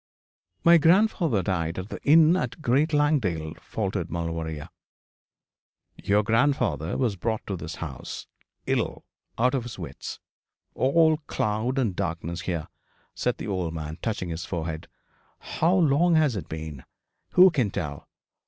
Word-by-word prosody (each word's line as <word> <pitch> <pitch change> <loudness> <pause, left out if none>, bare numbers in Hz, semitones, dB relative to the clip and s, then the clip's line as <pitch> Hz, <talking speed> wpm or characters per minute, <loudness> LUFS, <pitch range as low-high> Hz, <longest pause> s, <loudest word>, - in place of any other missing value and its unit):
'My 170 0 +7
grandfather 165 - +3
died 85 -3 -1
at 95 +3 -5
the - - -7
inn 160 +3 +6
at 185 - -2
Great 145 +3 +2
Langdale, 115 - +1
faltered 95 -5 -3
Maulevrier. 80 -2 -4 1.3
'Your 105 +1 +1
grandfather 115 - +1
was 120 -6 0
brought 110 +4 -2
to 100 - -3
this 80 -2 -6
house 75 -6 -7 0.4
ill - - -1 0.3
out 125 +3 +3
of 135 - +1
his 120 -1 -8
wits. 80 -7 -7 0.5
All 160 +4 +3
cloud 110 +5 -1
and 115 -9 0
darkness 85 -2 -3
here,' 85 -3 -3 0.5
said - - -1
the - - -6
old 90 -4 -2
man, 80 +1 -6
touching 105 -6 -2
his 85 +1 -4
forehead. 80 -3 -4 0.5
'How 170 +4 0
long 170 0 +4
has 150 -6 +3
it 85 -5 -5
been? 80 -4 -6 0.5
Who 185 +1 +8
can 130 -10 +1
tell? 75 -6 -5
100 Hz, 140 wpm, -26 LUFS, -, 1.3 s, Who